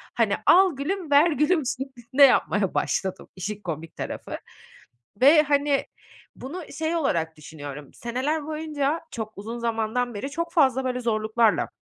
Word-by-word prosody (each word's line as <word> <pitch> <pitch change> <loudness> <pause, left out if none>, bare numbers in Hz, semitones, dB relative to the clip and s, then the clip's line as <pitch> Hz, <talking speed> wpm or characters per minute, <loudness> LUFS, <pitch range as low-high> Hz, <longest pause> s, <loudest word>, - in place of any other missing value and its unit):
hani, - - +2
al 370 -3 +6
gülüm, 330 +3 -3
ver 295 +4 +6
gülüm 300 +3 +2
şeklinde 260 0 0
yapmaya 210 -7 +4
başladım 190 -1 -1
işin 200 +3 -5
komik 165 -3 -6
tarafı. - - -5 0.8
Ve, 300 +4 +8
hani, 285 -1 +1 0.5
bunu 335 +8 -7
şey 320 +1 -2
olarak 165 - -1
düşünüyorum; 145 -2 -9
seneler 265 +6 -2
boyunca, 310 -1 -2
çok 220 -3 -5
uzun 225 +4 -6
zamandan 235 +1 -1
beri 245 +7 -5
çok 335 +3 -4
fazla 265 -5 +3
böyle 250 -1 -1
zorluklarla, 220 -1 +1
255 Hz, 135 wpm, -25 LUFS, 215-300 Hz, 0.8 s, Ve